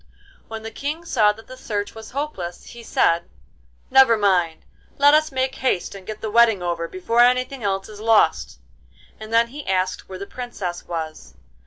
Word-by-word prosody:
When 220 -1 -7
the 225 - -6
King 300 +8 -5
saw 220 -9 +3
that 225 +2 -15
the 255 - -11
search 205 -5 -4
was 220 -1 -10
hopeless 250 -12 -5
he 235 - -11
said: 170 -6 +1 0.6
'Never 265 -4 +6
mind, 180 -6 +1 0.3
let 285 +1 +6
us 310 0 +3
make 260 0 -1
haste 255 -9 -1
and 195 -2 -11
get 215 -1 -6
the 220 - -4
wedding 225 -4 +4
over 170 -1 -2
before 185 +7 -2
anything 250 +2 +3
else 195 -2 -1
is 210 -1 -11
lost.' 220 0 +2 0.6
And 215 0 -9
then 230 +1 +3
he 285 +3 -9
asked 185 0 -1
where 190 - -7
the 200 - -6
Princess 200 -8 -6
was. 155 - -6
220 Hz, 180 wpm, -22 LUFS, 185-250 Hz, 0.6 s, Never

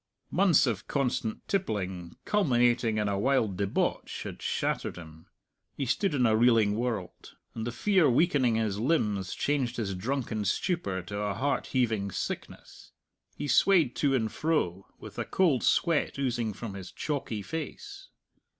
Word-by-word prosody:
Months 190 -7 +4
of 110 -6 -2
constant 125 -5 -2
tippling, 95 - -2
culminating 120 - +2
in 105 -1 0
a 100 -1 0
wild 120 -5 +1
debauch, 100 +1 -1
had - - -8
shattered - - -1
him. 80 -2 -12 0.5
He 140 - -2
stood 150 - 0
in 125 -3 +3
a 110 -1 +4
reeling 115 -3 +4
world. 110 -6 -4 0.2
And 110 0 -4
the - - -2
fear 185 - +3
weakening 130 -4 +3
his 110 -3 -1
limbs 105 - 0
changed 135 -4 -1
his 105 -4 -2
drunken 115 +2 -2
stupor 100 - -1
to 100 +3 -5
a 105 -1 -1
heart 140 +5 -1
heaving 110 -6 0
sickness. - - -6 0.4
He 145 - -4
swayed 160 0 +4
to 140 -2 +2
and 110 -4 0
fro, 100 - -1
with - - -10
a - - 0
cold 160 -10 +2
sweat 165 -4 +2
oozing 120 -5 -1
from 110 0 -7
his 95 -2 -8
chalky 130 -8 -3
face. 390 - -7
120 Hz, 150 wpm, -29 LUFS, 100-145 Hz, 0.5 s, Months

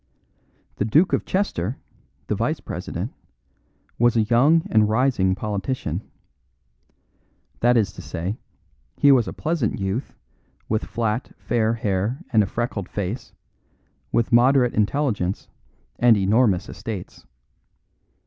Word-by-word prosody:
The 100 - 0
Duke 155 - +3
of - - +1
Chester, 130 - -1 0.5
the - - -1
vice - - -1
president, - - -5 0.9
was 120 0 +4
a 110 - +4
young 140 +9 +4
and 110 -1 +4
rising 110 -5 +2
politician. 100 -3 -3 1.6
That 120 +1 +4
is 110 -3 +1
to - - -9
say, 90 +7 -4 0.6
he 140 - +6
was 125 -4 +4
a - - -3
pleasant 155 -11 -1
youth, 95 +7 -3 0.5
with 110 0 -1
flat, 115 +2 -2
fair 115 -1 0
hair 105 +2 -1 0.2
and 110 - +6
a 100 - +1
freckled 115 -3 -3
face, 105 +5 -4 0.8
with 115 +1 +1
moderate 125 +1 +4
intelligence 105 -4 0 0.5
and 120 -3 +6
enormous 100 -1 +2
estates. - - -7
115 Hz, 120 wpm, -23 LUFS, 100-125 Hz, 1.6 s, he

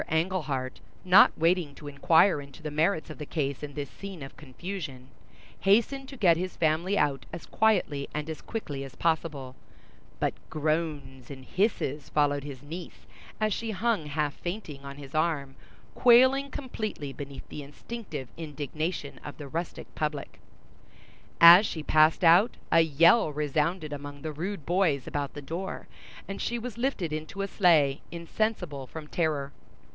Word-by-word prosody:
Englehart, 160 -6 -1 0.3
not 185 +2 +8
waiting 165 -3 +1
to 150 - -10
inquire 160 +3 +4
into 140 +2 -13
the 150 - -4
merits 160 +3 +1
of - - -10
the 150 - -5
case 140 -3 -2
in 145 -1 -7
this 145 -3 -4
scene 195 -6 -8
of 135 - -10
confusion, 150 -3 -7 0.5
hastened 235 +7 +2
to 270 - -9
get 175 -7 +4
his 185 +1 -4
family 165 +5 +1
out 135 -2 0
as 170 -1 -7
quietly 180 -10 +1
and 150 0 -4
as 160 - -6
quickly 145 -11 -5
as 135 -2 -10
possible, 155 -5 -1 0.6
but - - +1 0.2
groans 155 -4 -2
and 130 -2 -9
hisses 155 - -1
followed 145 -1 +1
his 140 -3 -8
niece 165 +4 -9 0.3
as 215 -1 +1
she 225 +3 -3
hung 210 -5 0
half 150 0 -1
fainting 175 -7 -6
on 140 0 -8
his 140 -1 -11
arm, 155 -4 0 0.4
quailing 260 +3 +5
completely 215 - -5
beneath 140 -1 -8
the 150 - -6
instinctive 150 - -7
indignation 155 0 -4
of 145 - -8
the 145 - -8
rustic 165 +5 -4
public. 150 -2 -4 1.0
As 170 +4 +10
she 160 -6 -4
passed 155 +4 +4
out, 175 +7 +6
a 165 - +6
yell 165 +4 +5
resounded 150 +2 -1
among 145 0 -8
the 155 -1 -4
rude 175 +1 -4
boys 170 -7 +1
about 145 -1 -4
the 145 - -7
door, 170 +7 -5 0.4
and 195 - -5
she 240 - -1
was 235 -1 -6
lifted 215 - -1
into 155 +6 -4
a - - -2
sleigh, 155 -8 +3
insensible 170 - -2
from 155 +3 -8
terror. 150 -4 -1
155 Hz, 155 wpm, -28 LUFS, 145-185 Hz, 1.0 s, As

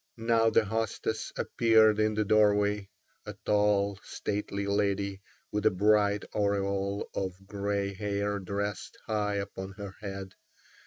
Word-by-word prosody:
Now 115 0 +3
the 110 0 +3
hostess 110 +1 -2
appeared 110 -2 +4
in 110 0 +2
the 110 0 +1
doorway, 105 -1 +3 0.4
a - - -6
tall, 100 -1 +2
stately 100 -1 -3
lady 100 -1 0 0.3
with 105 0 -1
a - - +7
bright 105 +1 +3
aureole 100 -1 0
of 95 0 -4
grey 100 0 -2
hair 100 0 -2
dressed 100 +2 -4
high 105 -2 0
upon 100 -1 -5
her 100 -1 -8
head. 95 -2 -6
100 Hz, 125 wpm, -29 LUFS, 100-105 Hz, 0.4 s, a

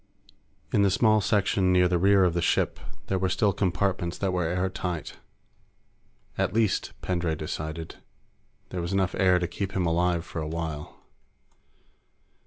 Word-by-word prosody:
In 105 - +4
the 100 - +4
small 110 +2 +3
section 95 -2 +2
near 90 0 +4
the 90 -1 +1
rear 100 +1 +5
of 90 -2 +2
the 85 - 0
ship, - - +1 0.3
there 95 - -1
were 95 0 0
still 100 +2 +2
compartments 90 -2 -1
that 95 -2 -1
were 90 -2 0
airtight. 90 -1 -3 1.2
At - - 0
least, 110 -4 +1
Pendray 85 -3 -1
decided, 80 +1 -5 0.7
there 90 - -4
was 85 +3 -3
enough 95 -2 +1
air 95 -2 +4
to 90 -1 -1
keep 95 +2 -4
him 95 -2 0
alive 85 0 +1
for 80 - -5
a 75 - -3
while. 80 -2 -5
90 Hz, 155 wpm, -27 LUFS, 85-95 Hz, 1.2 s, rear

